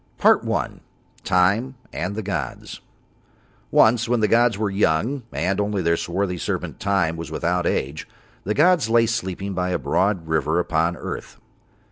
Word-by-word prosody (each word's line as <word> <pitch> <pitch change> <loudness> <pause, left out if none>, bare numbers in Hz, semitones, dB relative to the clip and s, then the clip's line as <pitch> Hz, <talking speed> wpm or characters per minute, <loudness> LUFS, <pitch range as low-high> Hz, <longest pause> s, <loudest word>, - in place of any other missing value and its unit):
PART - - +5
I. - - -2 0.4
TIME 100 +8 +2 0.2
AND 100 +2 -3
THE 110 - -4
GODS 95 -5 -5 0.9
Once 115 +1 +4
when 120 -1 +2
the 105 - +3
gods 115 -1 +3
were 105 -1 -1
young 105 - +1
and 95 +2 -1
only 100 -2 -1
Their 85 0 +3
swarthy 90 +1 -2
servant - - -3
Time 95 -5 0
was 80 - -6
without 90 0 -1
age, 70 +4 -2 0.4
the 105 +2 -2
gods 160 -6 +4
lay 115 0 +4
sleeping 100 -4 -3
by 90 0 -1
a 90 - 0
broad 95 -3 0
river 80 0 0
upon 85 0 0
earth. - - -7
95 Hz, 155 wpm, -22 LUFS, 85-110 Hz, 0.9 s, PART